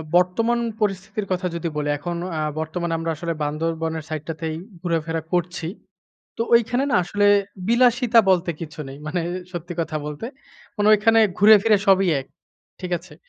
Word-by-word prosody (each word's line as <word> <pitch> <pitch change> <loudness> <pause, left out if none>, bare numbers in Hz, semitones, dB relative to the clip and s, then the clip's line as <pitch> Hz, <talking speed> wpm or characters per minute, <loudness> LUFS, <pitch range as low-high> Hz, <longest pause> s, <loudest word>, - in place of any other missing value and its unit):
বর্তমান 225 +7 +2 0.2
পরিস্থিতির 200 +1 -2
কথা 185 0 -1
যদি 170 0 -3
বলি 145 0 -1
এখন 175 +4 -4 0.2
আ - - 0 0.2
বর্তমানে 165 +2 -3
আমরা 165 0 -2
আসলে 170 +2 -3
বান্ধরবনের 160 +1 -2
সাইডটাতেই 155 +1 -4 0.3
ঘুরাফেরা 165 -2 -1
করছি। 175 -1 -1 0.7
তো 230 - 0
ঐখানে 245 +3 +3
না - - +3
আসলে 205 +3 +1 0.4
বিলাসিতা 240 0 +4
বলতে 180 -2 +2
কিছু 155 -2 -7
নেই। 135 +1 -9
মানে 165 +3 -1 0.3
সত্যি 175 0 -6
কথা 160 -1 -2
বলতে। 150 +8 -5 0.5
মানে 205 0 +2
ঐখানে 225 +2 +4 0.2
ঘুরে 210 +2 +8
ফিরে 220 -1 +5
সবই 195 -1 +4
এক। 135 - -11 0.5
ঠিক 180 -1 -5
আছে? 170 -2 -16
175 Hz, 155 wpm, -22 LUFS, 160-210 Hz, 0.7 s, ঘুরে